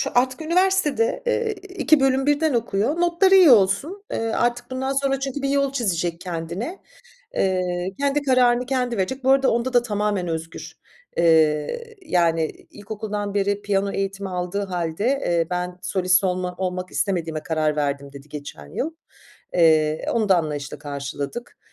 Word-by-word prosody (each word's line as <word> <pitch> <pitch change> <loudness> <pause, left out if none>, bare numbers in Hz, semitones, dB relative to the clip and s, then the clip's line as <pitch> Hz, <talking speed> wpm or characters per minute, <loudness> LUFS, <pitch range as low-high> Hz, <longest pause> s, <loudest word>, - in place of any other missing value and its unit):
artık 255 +2 +2
şu 315 - -6
üniversitede, 380 - +2
eee, 470 -2 0
2 370 -6 +1
bölüm 270 0 +2
birden 290 +1 +2
okuyor. 230 +5 0
Notları 350 +3 +4
iyi 370 -5 +8
olsun. 235 - +3
Eee, - - -1
artık 240 +2 -1
bundan 265 +1 -2
sonra 270 -1 +1
çünkü 275 +1 -4
bir 275 - 0
yol 280 -1 +1
çizecek 175 -9 -1
kendine. 180 - -5 0.6
Eee, 185 -1 0
kendi 280 +1 +1
kararını 250 -2 +3
kendi 250 -2 -1
verecek. 255 +8 -2
Bu 265 - +4
arada 270 0 +4
onda 240 +2 0
da 245 -1 +4
tamamen 205 -5 -1
özgür, 165 0 -5 0.4
eee, 160 - +2
yani, 165 -2 +2 0.3
ilkokuldan 205 -1 -5
beri 205 0 0
piyano 200 -1 0
eğitimi 195 0 -3
aldığı 180 +2 -3
hâlde, 175 0 -3
eee, 175 -11 +1
ben 180 0 -3
solist 185 +1 +2
olma 180 -1 -1
olmak 185 -1 -3
istemediğime 165 -5 -1
karar 155 -3 0
verdim 140 -1 -2
dedi 140 +1 -12
geçen 145 - -8
yıl. 275 - -3 0.6
Eee, 155 -2 +3
onu 220 -3 +1
da 190 - +6
anlayışla 150 -4 -3
karşıladık. 140 - -6
200 Hz, 150 wpm, -23 LUFS, 170-270 Hz, 0.6 s, iyi